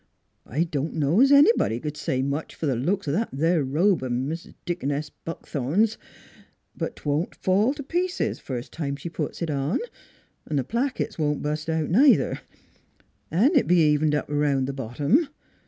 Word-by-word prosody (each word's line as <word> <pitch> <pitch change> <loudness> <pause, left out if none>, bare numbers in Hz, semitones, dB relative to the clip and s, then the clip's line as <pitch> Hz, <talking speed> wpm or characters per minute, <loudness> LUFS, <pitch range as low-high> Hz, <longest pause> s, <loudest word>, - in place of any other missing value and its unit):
" - - -47
I 150 +8 0
don' 155 -2 -3
know 155 +6 +2
es 270 - +6
anybody 285 - +5
c'd 150 +3 -5
say 130 -3 -1
much 140 +3 -3
fer - - -4
th' 135 -4 +1
looks 195 +3 0
o' - - +1
that 220 +10 0
there 165 +3 +1
robe 165 +7 +2
of 130 -1 -3
Mis' 140 +7 -3 0.2
Deaconess 150 -4 -2
Buckthorn's; 165 - -2 0.8
but - - -4
't - - -18
won't 150 +5 0
fall 205 +9 +2
t' 290 - -6
pieces 355 +5 -1
first 125 -2 -6
time 140 -4 -3
she 145 +5 -7
puts 170 - -4
it 165 - -2
on; 140 +3 0 0.7
'n' 150 - 0
th' 135 -2 -1
plackets 250 -3 -2
won't 150 -1 0
bust 150 +2 -2
out, 160 -1 -1
neither, 265 +9 +4 0.9
'n' 220 - +4
it's 275 - +4
be'n 180 - +4
evened 150 -1 +3
up 150 - -1
'round 145 -2 +1
th' 135 - -4
bottom. 140 - +1
155 Hz, 180 wpm, -25 LUFS, 140-190 Hz, 0.9 s, es